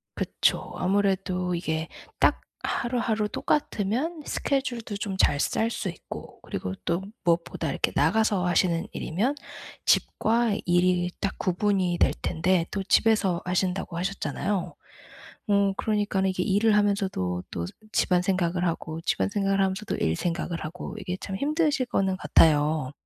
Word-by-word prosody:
그쵸. - - 0
아무래도 185 -2 0
이게 160 -1 -2 0.3
딱 - - +3 0.2
하루하루 230 -3 -1
똑같으면 290 - -1
스케줄도 245 -6 -2
좀 200 -1 -3
잘 145 -6 +3
짤 225 +8 +1
수 215 - -3
있고 170 - -9
그리고 95 0 -4
또 170 +3 0 0.2
무엇보다 170 -2 0
이렇게 - - 0
나가서 185 +4 +2
하시는 175 -1 +2
일이면 225 - -1 0.5
집과 230 -1 +2
일이 180 0 +3
딱 195 - -2
구분이 185 -1 +1
될 - - +4
텐데 170 +1 +1
또 195 -1 -2
집에서 200 -4 +3
하신다고 180 0 -1
하셨잖아요. 190 0 -2 0.7
어 200 -1 +3
그러니까는 205 -3 +1
이게 185 -1 -1
일을 210 +2 +3
하면서도 190 - 0
또 85 -1 -3
스 - - -9 0.2
집안 180 -2 +3
생각을 180 -1 0
하고 160 -1 -3
집안 - - +1
생각을 195 -1 +1
하면서도 195 +2 0
일 80 0 0
생각을 170 -1 -2
하고 170 +4 -6
이게 180 +1 -4
참 190 -1 -4
힘드실 295 - +1
거는 190 -4 0
같아요. 150 -5 +3
190 Hz, 310 characters per minute, -26 LUFS, 175-210 Hz, 0.7 s, 될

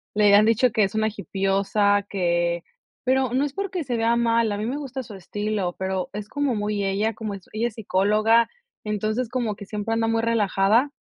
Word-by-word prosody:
le 205 -1 +5
han 205 +1 +7
dicho 230 +2 +3
que 215 -1 +2
es 195 +1 -1
una 220 0 +2
hippiosa, 200 +1 +1
que 175 -2 0 0.4
pero 260 -1 +1
no 265 +3 +2
es 285 - -5
porque 385 -2 -3
se 245 -4 -2
vea 230 +1 +2
mal, 230 -1 +2
a 205 - -2
mí 210 - -3
me 255 +5 -2
gusta 270 -2 -5
su 215 - -11
estilo, 205 -1 -3
pero. 190 -1 -2
es 210 0 -5
como 285 0 -1
muy 205 -1 -1
ella, 200 +3 0
como 215 -1 -5
ella 215 +5 -3
es 230 - -9
psicóloga, 215 +3 +2 0.3
entonces 215 +3 -2
como 235 -4 -2
que 200 - -10
siempre 210 +2 -3
anda 225 0 +1
muy 225 0 +1
relajada, 220 +2 +2
215 Hz, 200 wpm, -24 LUFS, 200-235 Hz, 0.4 s, han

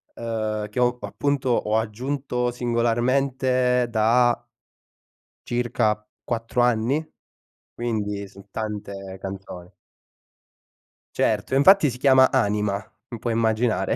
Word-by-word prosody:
uhm, 110 -2 -3
che 125 - -4
ho, 125 0 +2
appunto, 140 -2 -1
ho 110 -2 +1
aggiunto 125 +2 -2
singolarmente 125 +1 +1
da 120 +2 +3 1.0
circa 110 -3 0 0.2
4 115 +1 -1
anni? 125 +5 +2 0.7
Quindi 105 -4 -3
son 100 +1 -16
tante 100 -3 -5
canzoni. 95 -2 -8 1.4
Certo, 135 - 0
infatti 155 +2 +6
si 125 - -6
chiama 130 0 +5
Anima, 105 -5 +1 0.3
m 120 - -6
puoi 115 +1 -2
immaginare. 110 -2 +1
120 Hz, 100 wpm, -24 LUFS, 105-125 Hz, 1.4 s, infatti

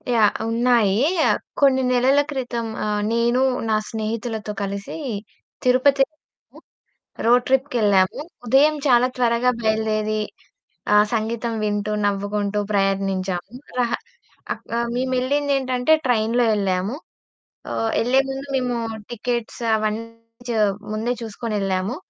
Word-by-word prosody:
Yeah! 215 -2 +5 0.2
ఉన్నాయీ. 230 -3 +3 0.3
ఆహ్, - - +2 0.2
కొన్ని 265 -2 +5
నెలల 260 +3 +4
క్రితం 245 -4 -3 0.2
ఆహ్, 210 0 0
నేను, 235 +2 +2 0.3
నా 215 - +3
స్నేహితులతో 220 0 -3
కలిసీ 200 0 -4 0.7
తిరుపతెళ్ళాము. 270 +4 0 0.7
రోడ్ 245 +1 +5
ట్రిప్‌కెళ్ళాము. 235 -7 +2 0.3
ఉదయం 280 +6 +5
చాలా 250 -1 +5
త్వరగా 240 0 +3
బయలుదేరీ 215 -1 0 0.7
ఆహ్, 210 0 +6
సంగీతం 230 +1 -1
వింటూ, 205 0 -1
నవ్వుకుంటూ 205 +1 -1
ప్రయాణించాము. 195 -1 0 0.3
రహ 240 -1 +1 0.6
అక్ - - -19
ఆహ్, 235 0 -1
మేమెళ్ళిందేంటంటే 260 +1 +1
ట్రైన్‌లో 235 0 +2
యెళ్ళాము. 195 +2 0 0.8
ఆహ్, 225 0 -1
యెళ్ళే 255 +3 +3
ముందు 270 +1 -5
మేమూ 250 -2 0 0.3
టికెట్స్ 240 0 -3 0.2
అవన్నీ 215 +1 -2 0.4
చ - - 0 0.4
ముందే 220 +3 -1
చూసుకొనెళ్ళాము. 205 -1 -2
230 Hz, 105 wpm, -22 LUFS, 210-250 Hz, 0.8 s, ఆహ్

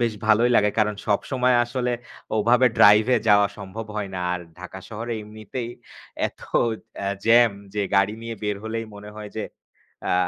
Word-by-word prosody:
বেশ 115 -2 +1
ভালোই 110 +3 +4
লাগে। 105 0 +4
কারণ 105 0 +2
সবসময় 125 +4 +1
আসলে 125 0 -2 0.5
ওভাবে 120 +4 +4
ড্রাইভে 110 +4 +6
যাওয়া 105 0 +6
সম্ভব 100 +3 -7
হয় 100 -2 -2
না। - - -3
আর 90 - -2 0.2
ঢাকা 95 +1 -8
শহরে 115 +2 -5
এমনিতেই 110 +3 -7 0.6
এত - - -12 0.6
অ্যা 100 - -2 0.2
জ্যাম 120 0 +6 0.2
যে 105 - 0
গাড়ি 100 +2 +3
নিয়ে 115 0 -5
বের 105 -1 -1
হলেই 115 +1 -3
মনে 105 +1 -10
হয় 105 -1 -7
যে 110 - -2 0.7
আ - - +2
110 Hz, 165 wpm, -24 LUFS, 105-120 Hz, 0.7 s, ড্রাইভে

